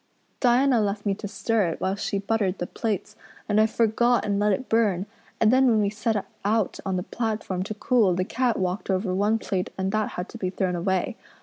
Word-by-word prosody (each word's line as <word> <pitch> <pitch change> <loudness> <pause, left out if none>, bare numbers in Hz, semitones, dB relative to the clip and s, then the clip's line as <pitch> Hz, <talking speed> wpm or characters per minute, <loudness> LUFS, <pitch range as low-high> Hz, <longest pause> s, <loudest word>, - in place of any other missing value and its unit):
Diana 250 -1 +4
left 205 0 -2
me 200 - +2
to 205 +1 -6
stir 210 0 0
it 165 - -4
while 190 - 0
she 200 0 -2
buttered 200 -2 0
the 175 - -3
plates 210 +1 -3 0.3
and 215 0 +3
I 220 - +4
forgot 230 +1 +2
and 200 -1 0
let 210 0 +3
it 225 +7 -1
burn; 205 -5 +2 0.3
and 225 +1 +4
then 260 0 +5
when 225 -3 +4
we 205 -1 +1
set 215 +1 -1
it 205 - -1 0.2
out 215 0 0
on 190 -1 -1
the 180 - -1
platform 215 -5 -3
to 210 +3 -4
cool 215 -5 +2
the 185 +1 0
cat 245 +2 0
walked 185 +2 -2
over 190 0 0
one 205 +4 +2
plate 190 -4 -2
and 190 0 -1
that 215 0 -1
had 180 +2 -3
to 235 - -10
be 185 - -1
thrown 185 -1 -1
away. 190 +6 -1
205 Hz, 225 wpm, -25 LUFS, 190-225 Hz, 0.3 s, then